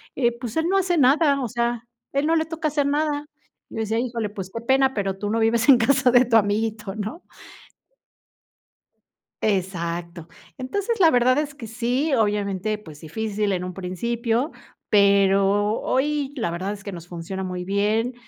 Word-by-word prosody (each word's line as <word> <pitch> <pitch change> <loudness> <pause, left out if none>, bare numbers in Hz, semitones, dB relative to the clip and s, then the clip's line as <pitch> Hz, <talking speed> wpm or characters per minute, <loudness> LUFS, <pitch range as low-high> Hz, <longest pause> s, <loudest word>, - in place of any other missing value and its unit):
eh, 240 -3 +2
pues, 240 +1 -5
él 320 +1 +1
no 390 - +3
hace 360 -2 +1
nada, 280 +1 +4
o 250 - -1
sea, 235 0 -2 0.3
él 280 +2 +1
no 330 - +3
le 320 0 +1
toca 320 -1 -3
hacer 290 -1 0
nada". 295 0 0 0.4
Yo - - -11
le 225 - -2
decía 220 +1 -1
"Híjole, 235 -4 -2
pues, 190 -2 -7
qué 230 - -4
pena, 265 +2 +2
pero 195 -2 -2
tú 205 +1 -3
no 225 +1 0
vives 225 +2 +2
en 265 - +9
casa 260 +1 +3
de 245 +1 +6
tu 230 -1 +4
amiguito", 210 -1 -1
¿no? 215 - -5 2.2
Exacto. 175 -4 -2 0.3
Entonces, 405 - -2
la 340 -4 +7
verdad 250 -1 +3
es 300 -2 -3
que 260 -5 -8
sí, 245 +6 -1
obviamente, 210 -2 0
pues, 160 -8 -13
difícil 210 +5 -2
en 180 -1 -2
un 180 0 -5
principio, 230 - -2 0.4
pero 200 +1 +3
hoy, 285 +1 0
la 225 -9 -2
verdad 190 +4 -3
es 200 - -11
que 200 - -6
nos 175 -1 -9
funciona 180 +2 -6
muy 180 -1 -4
bien, 210 +5 0
225 Hz, 175 wpm, -23 LUFS, 200-265 Hz, 2.2 s, en